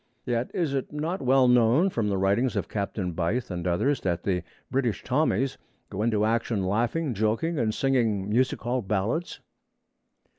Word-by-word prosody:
Yet 120 0 -1
is 165 -6 -1
it 135 -2 -2
not 155 +5 -3
well 130 0 +4
known 125 +9 +4
from 115 -8 -1
the 100 - 0
writings 100 +6 +1
of - - -1
Captain 100 -3 -3
Beith 90 +8 -2
and 90 0 -3
others 135 +11 +1
that 85 -2 -1
the 90 -3 0 0.3
British 125 -5 0
Tommies 130 -2 0 0.3
go 100 - -3
into 110 -2 +2
action 110 -3 0
laughing, 120 - 0
joking, 115 - 0
and 110 -3 +1
singing 115 -6 +1
music 125 +5 +1
hall 125 +1 -1
ballads? 105 - -2
115 Hz, 160 wpm, -26 LUFS, 100-135 Hz, 0.3 s, well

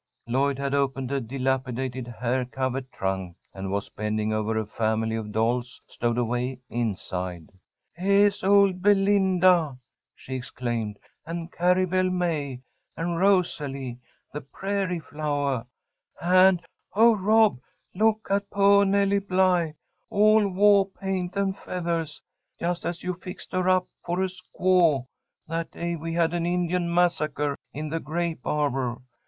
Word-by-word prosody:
Lloyd 135 +3 +1
had 140 0 -2
opened 135 -2 0
a 140 -1 0
dilapidated 130 0 -2
hair 125 +2 -1
covered 130 +1 -3
trunk, 95 -2 -3 0.2
and 95 0 -5
was 100 0 -2
bending 110 0 -2
over 110 +1 -1
a 110 - -1
family 110 +1 -1
of 110 -2 -4
dolls 120 +3 -1
stowed 120 0 -2
away 125 +2 -1
inside. 90 -7 -3 0.4
"Heah 200 +3 +4
is 205 0 0
old 195 -2 +4
Belinda!" 190 -6 +4 0.4
she 130 - -9
exclaimed. 120 -4 -3 0.3
"And 170 +1 -6
Carrie 180 +2 +2
Belle 185 +1 +1
May, 155 -8 -2 0.4
and 170 0 -2
Rosalie, 145 -10 0 0.3
the 150 - -4
Prairie 190 +4 -2
Flowah! 145 -5 -2 0.5
'And, 185 0 +5 0.3
oh, 225 +2 +6
Rob! 215 - +3 0.3
Look 220 +2 +2
at 200 0 0
poah 200 0 +5
Nelly 200 0 +2
Bly, 185 -4 +1 0.3
all 215 0 +4
wah 200 +1 +5
paint 190 -1 -4
and 195 -1 0
feathahs, 170 -5 -3 0.4
just 175 0 -2
as 170 -1 -4
you 180 - -1
fixed 180 +1 -10
her 185 0 +1
up 185 0 +3 0.2
for 180 +2 -1
a 190 - 0
squaw 180 -6 +2 0.4
that 165 +1 -3
day 170 0 -3
we 165 +1 -5
had 165 0 +1
an 170 -1 -1
Indian 175 0 0
massacre 150 -5 +1 0.2
in 150 +1 -5
the 165 +2 -2
grape 165 -1 -3
arbour. 135 -5 0
165 Hz, 135 wpm, -26 LUFS, 125-185 Hz, 0.5 s, oh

